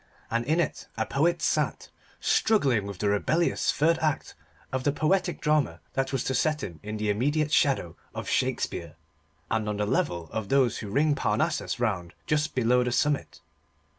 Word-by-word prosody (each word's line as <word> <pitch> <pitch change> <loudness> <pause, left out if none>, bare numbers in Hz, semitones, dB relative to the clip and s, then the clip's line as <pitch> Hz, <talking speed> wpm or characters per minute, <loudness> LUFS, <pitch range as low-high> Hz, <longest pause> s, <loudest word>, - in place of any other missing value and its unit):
And 115 +1 +1
in 155 +5 +2
it 170 - -2
a 110 - 0
poet 170 +8 +1
sat, - - 0 0.3
struggling 135 - +2
with 100 -2 -6
the 105 +2 0
rebellious 155 +12 +1
third 165 +2 +2
act 155 -2 -1 0.4
of 130 -1 -2
the 145 - +3
poetic 175 +4 +1
drama 150 - +1
that 135 0 -1
was 135 -2 -1
to 130 - -1
set 150 +3 +1
him 85 -4 -6
in 105 +1 -5
the 105 -1 0
immediate 145 +8 0
shadow 130 - +2 0.2
of - - -5
Shakespeare, 85 -2 -1 0.6
and 110 -1 0
on 105 - -2
the 105 - 0
level 85 -5 0
of 110 -3 -4
those 130 -4 +3
who 105 - -6
ring 145 +7 +3
Parnassus 145 +4 0
round 95 -7 -1
just 150 0 0
below 125 0 +3
the 125 - -1
summit. 145 +3 0
130 Hz, 175 wpm, -27 LUFS, 105-150 Hz, 0.6 s, the